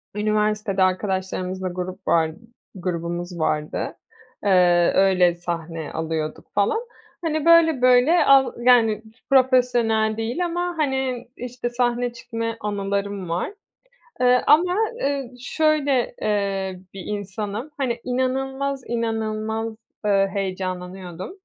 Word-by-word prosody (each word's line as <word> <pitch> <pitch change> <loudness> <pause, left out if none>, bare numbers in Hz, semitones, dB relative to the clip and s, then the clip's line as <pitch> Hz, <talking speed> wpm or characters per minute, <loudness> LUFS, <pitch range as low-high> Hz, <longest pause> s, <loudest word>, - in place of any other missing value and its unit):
üniversitede 210 -1 +1
arkadaşlarımızla 185 0 -1
grup 180 +1 -6
var 160 -1 +3 0.4
grubumuz 175 -1 -4
vardı. 155 -1 -1 0.5
Iıı, 180 -3 +4
öyle, 185 -3 +4
sahne 165 -2 -5
alıyorduk, 160 -1 -3
falan. 205 - +2 0.4
Hani, 310 -1 -1
böyle, 330 -5 +6
böyle, 255 +7 +5
al 270 -1 +5
yani, 225 -4 +5 0.3
profesyonel 245 -4 +3
değil 240 +11 -1
ama, 350 +1 -2
hani, 265 -4 -1
işte, 245 0 -4
sahne 240 0 0
çıkmaya 230 -1 -4
anılarım 200 -2 -3
var. 175 - -2 0.7
Eee, 250 0 +5
ama, 350 +5 +5 0.3
ııı, 275 -3 -1
şöyle, 285 -2 +1
eee, 195 -3 -1
bir 195 - -7
insanım, 210 +5 -4
hani, 245 -4 -1
inanılmaz, 265 +2 -1
inanılmaz, 225 -1 -2 0.3
eee, 195 -1 +3
heyecanlanıyordum. 185 - -4
215 Hz, 105 wpm, -23 LUFS, 185-255 Hz, 0.7 s, böyle